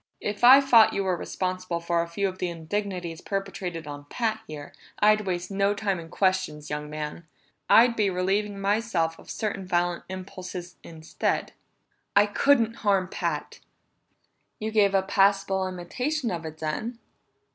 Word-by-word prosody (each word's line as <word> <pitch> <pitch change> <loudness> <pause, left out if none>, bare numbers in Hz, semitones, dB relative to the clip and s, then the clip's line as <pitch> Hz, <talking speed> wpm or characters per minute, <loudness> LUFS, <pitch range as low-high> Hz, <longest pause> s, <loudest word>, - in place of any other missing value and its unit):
"If 210 +2 -4
I 260 +3 +10
thought 235 -5 +6
you 200 - 0
were 185 -1 +1
responsible 185 0 -3
for 170 0 0
a 170 - -3
few 195 +4 -1
of 185 0 -6
the 180 - -1
indignities 175 0 -4
perpetrated 190 -4 -4
on 145 -1 -8
Pat 220 -3 -1
here, 150 -2 -8 0.2
I'd 215 -1 +3
waste 180 +1 -2
no 200 +1 +1
time 200 -3 -1
in 165 -1 -10
questions, 165 -7 0
young 150 0 -4
man. 150 +2 -6 0.4
I'd 235 +1 +6
be 210 -3 +2
relieving 195 +3 -1
myself 195 -5 0
of - - -15
certain 200 -3 -3
violent 175 -1 0
impulses 185 -1 -7
instead." 160 -1 -3 0.6
"I 200 +1 +7
couldn't 230 +1 +2
harm 195 -3 +1
Pat!" - - -3 1.0
"You 220 +1 -4
gave 200 -2 +3
a 190 - +3
passable 195 -1 +2
imitation 245 - -3
of 165 -2 -4
it, 155 0 -9
then! 185 +10 -3
190 Hz, 155 wpm, -26 LUFS, 170-210 Hz, 1.0 s, I